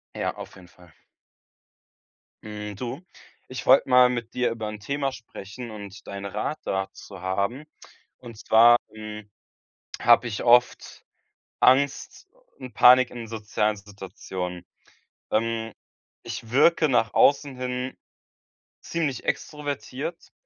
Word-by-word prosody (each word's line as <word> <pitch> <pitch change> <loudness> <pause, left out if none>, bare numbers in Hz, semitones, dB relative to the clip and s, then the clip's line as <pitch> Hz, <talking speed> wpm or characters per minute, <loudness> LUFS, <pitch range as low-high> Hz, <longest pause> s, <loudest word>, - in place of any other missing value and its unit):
Ja, - - -2
auf - - -10
jeden 90 -2 -15
Fall. 90 -1 -20 1.5
Hm, 105 -1 -7
du, 125 - -6 0.5
ich 130 - -7
wollte 130 +1 +5
mal 125 -1 +6
mit 120 -2 -4
dir 125 -1 +1
über 115 -2 -5
'n 105 0 -8
Thema 140 +5 -2
sprechen 115 -1 -10
und 100 -2 -10
deinen 100 0 -6
Rat 105 +10 -3
dazu 95 0 -5
haben. 100 +9 -2 0.5
Und 115 -3 -11
zwar, 115 +2 +6 0.2
hm, 110 -1 -8 0.7
habe 120 0 +5
ich 105 - -4
oft 120 +1 +2 0.6
Angst 135 +2 +2 0.3
und 130 -2 -9
Panik 125 0 +7
in 115 -2 -8
sozialen 105 -1 -1
Situationen. 95 -3 -7 0.7
Ähm, 115 0 -1 0.5
ich 115 - -7
wirke 155 +4 +4
nach 115 -4 +1
außen 140 -1 +3
hin 125 0 -4 0.8
ziemlich 150 -7 -3
extrovertiert 150 +2 -4
115 Hz, 115 wpm, -25 LUFS, 105-130 Hz, 1.5 s, Panik